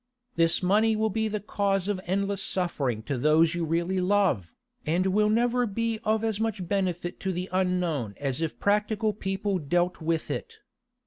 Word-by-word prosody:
This 165 +2 +2
money 215 +4 +3
will 220 0 0
be 220 +2 0
the 210 0 -2
cause 200 -2 0
of 200 -3 -1
endless 200 +2 -1
suffering 140 - -1
to 135 +1 -3
those 155 +4 +4
you 170 0 -2
really 170 +3 0
love, 180 - +1 0.3
and 170 +4 +1
will 210 +3 +3
never 240 +2 +2
be 225 +2 -2
of 220 0 +1
as 220 -2 -1
much 215 -5 -2
benefit 180 -2 -1
to 190 - -2
the 180 +1 -3
unknown 180 - 0
as 140 +1 -2
if 160 -2 -3
practical 210 +1 +1
people 195 -1 -2
dealt 175 +4 0
with 160 0 -1
it. 460 -1 -5
190 Hz, 175 wpm, -27 LUFS, 170-210 Hz, 0.3 s, those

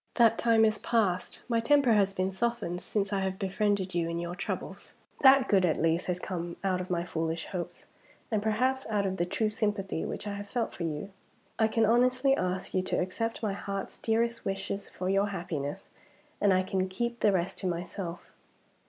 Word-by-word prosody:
That 230 -2 +5
time 225 -1 +5
is 215 -1 +1
past. 200 -6 0
My 230 -2 +2
temper 260 +1 +4
has 200 -2 +3
been 190 0 -1
softened, 205 -4 -1
since 205 -1 -1
I 195 - +1
have 190 0 -2
befriended 195 -1 0
you 170 -1 0
in 170 - -2
your 170 0 -3
troubles. 180 - -5 0.3
That 270 -1 +7
good 195 -3 +4
at 170 -3 +2
least 165 +2 +1
has 180 -1 -1
come 175 -2 -4
out 185 -2 +1
of 185 - -7
my 170 -1 0
foolish 165 -1 -2
hopes, 180 -3 -5 0.5
and 215 -2 +1
perhaps 250 +4 0
out 205 -2 +1
of 190 0 -1
the 175 - 0
true 215 +3 0
sympathy 205 -5 -1
which - - -5
I 205 - -3
have 200 0 -6
felt 235 -1 -1
for 170 - -4
you. 160 +5 -4 0.5
I 220 - +5
can 220 0 +2
honestly 255 +4 +4
ask 185 -3 -2
you 185 - +2
to 185 - -1
accept 225 +6 -2
my 210 -2 0
heart's 195 0 -5
dearest 230 +1 0
wishes 195 +1 -3
for 185 - -5
your 195 +2 +3
happiness 170 -7 -4 0.5
and 200 -1 +5
I 185 0 +3
can 190 0 -1
keep 235 +5 -2
the 210 - +4
rest 185 -1 -1
to 190 - -2
myself. 175 0 -5
195 Hz, 200 wpm, -29 LUFS, 180-225 Hz, 0.5 s, That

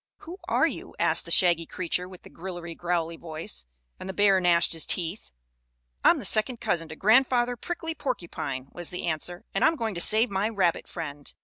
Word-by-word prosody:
"Who 350 +4 -9
are - - +3
you?" - - -5
asked - - +2
the - - -9
shaggy 170 -2 +4
creature 180 0 -3
with 185 -1 -13
the - - -13
grillery 175 -1 -7
growlery 170 -1 -2
voice, 155 - -7 0.3
and 190 - -7
the 190 - -5
bear 200 -2 +4
gnashed 175 -1 +3
his 165 - +3
teeth. 175 +3 -1 0.7
"I'm - - +6
the - - -5
second 230 +3 +3
cousin 165 -2 -1
to 160 - -7
Grandfather 245 +4 +3
Prickly 325 +5 -4
Porcupine," 170 - -4
was 175 -1 -3
the 180 - -5
answer, 175 +2 -3
"and - - 0
I'm 320 - +4
going 225 -6 -3
to 170 - -3
save 220 +4 +4
my 200 +3 0
rabbit 190 -6 0
friend." 145 -4 -7
180 Hz, 195 wpm, -26 LUFS, 165-220 Hz, 0.7 s, I'm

